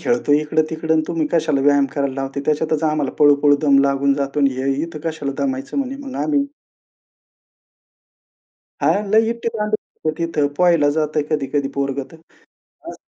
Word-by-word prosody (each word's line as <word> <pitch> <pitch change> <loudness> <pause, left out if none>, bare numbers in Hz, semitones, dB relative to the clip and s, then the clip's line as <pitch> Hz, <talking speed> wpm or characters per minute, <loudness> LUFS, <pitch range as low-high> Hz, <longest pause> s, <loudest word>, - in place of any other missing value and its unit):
खेळतोय 150 -12 +2
इकडं-तिकडं 155 +1 -1
आणि 160 - +2
तुम्ही 165 -2 -1
कशाला 155 -4 +1
व्यायाम 140 -1 +4
करायला 140 -2 -1
लावते. 135 +1 -4
त्याच्यातच 155 +1 0
आम्हाला 150 -3 -1
पळू-पळू 145 0 +5
दम 140 -2 +5
लागून 140 0 +1
जातो 140 +1 -2
आणि 140 - +4
हे 135 +1 0
इथं 165 -2 -5
कशाला 145 -4 -4
दमायचं 135 - -3
म्हणे 275 0 -2
मग 270 - -7
आम्ही" 290 -2 +1 2.4
हां. 205 - +2
लई 220 +1 +4
ईटी-दांडू 225 -2 -2
खेळतो 155 - -5
तिथे. 165 -3 0
पोहायला 170 -5 +4
जातोय 155 0 0
कधी-कधी 140 -2 -1
पोरगं 140 0 -1
तर. - - -12 0.7
हां. - - -7
150 Hz, 150 wpm, -20 LUFS, 140-165 Hz, 2.4 s, पळू-पळू